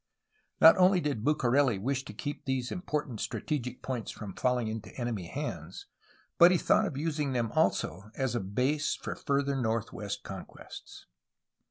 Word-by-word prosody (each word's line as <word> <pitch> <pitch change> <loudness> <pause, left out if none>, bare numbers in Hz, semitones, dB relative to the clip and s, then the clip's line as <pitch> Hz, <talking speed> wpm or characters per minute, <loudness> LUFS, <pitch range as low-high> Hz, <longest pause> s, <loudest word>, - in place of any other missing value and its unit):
Not 160 - +9
only 185 0 +5
did 145 -9 -2
Bucareli 135 -4 +3
wish 130 +6 -1
to 105 - -8
keep 145 +6 -5
these 130 -2 -1
important 150 - -3
strategic 130 -5 -3
points 125 -4 -3
from 100 -3 -7
falling 125 0 0
into 110 0 -5
enemy 115 -8 -3
hands, - - -5 0.5
but 175 - +10
he 180 - +4
thought - - +3
of 135 - -5
using 150 -2 -1
them 120 -3 0
also 95 +6 0
as 130 -2 -1
a 120 - 0
base 130 +10 0
for - - -5
further 140 -1 0
north 115 -3 -1
ward 105 -1 -6
conquests. 95 -2 -10
130 Hz, 160 wpm, -30 LUFS, 110-145 Hz, 0.5 s, but